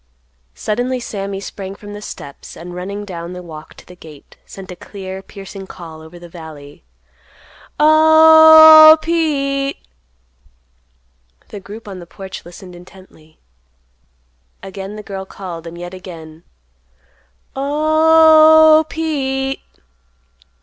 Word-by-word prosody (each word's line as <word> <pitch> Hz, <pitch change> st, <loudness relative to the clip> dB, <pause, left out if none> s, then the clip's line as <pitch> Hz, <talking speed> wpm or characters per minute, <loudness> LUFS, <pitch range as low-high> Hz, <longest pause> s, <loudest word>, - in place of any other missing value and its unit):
Suddenly 245 Hz, +4 st, -3 dB
Sammy 200 Hz, -4 st, -6 dB
sprang 195 Hz, 0 st, -9 dB
from 205 Hz, 0 st, -12 dB
the 205 Hz, -, -9 dB
steps 140 Hz, -8 st, -11 dB
and 175 Hz, +1 st, -10 dB
running 200 Hz, +3 st, -7 dB
down 170 Hz, -2 st, -8 dB
the 180 Hz, 0 st, -9 dB
walk 155 Hz, -3 st, -12 dB
to -, -, -17 dB
the 180 Hz, -, -15 dB
gate 155 Hz, -4 st, -16 dB
sent 190 Hz, -1 st, -11 dB
a -, -, -9 dB
clear, 190 Hz, 0 st, -10 dB
piercing 195 Hz, 0 st, -12 dB
call 165 Hz, -4 st, -12 dB
over 160 Hz, +2 st, -14 dB
the 175 Hz, 0 st, -13 dB
valley: 155 Hz, -, -13 dB, 1.0 s
"O—h—h, 315 Hz, 0 st, +7 dB
Pete." 280 Hz, -4 st, -2 dB, 1.7 s
The 205 Hz, -, -9 dB
group 210 Hz, +3 st, -12 dB
on 190 Hz, -2 st, -9 dB
the 175 Hz, -, -13 dB
porch 190 Hz, +2 st, -10 dB
listened 175 Hz, +1 st, -13 dB
intently. 175 Hz, -3 st, -18 dB, 1.3 s
Again 195 Hz, +1 st, -9 dB
the 210 Hz, -, -9 dB
girl 195 Hz, -1 st, -7 dB
called, 175 Hz, -4 st, -10 dB
and 165 Hz, +1 st, -10 dB
yet 175 Hz, +1 st, -9 dB
again: 165 Hz, -3 st, -12 dB, 1.1 s
"O—h—h, 315 Hz, +2 st, +4 dB
Pete." 270 Hz, -4 st, -3 dB
195 Hz, 115 wpm, -16 LUFS, -, 1.7 s, O—h—h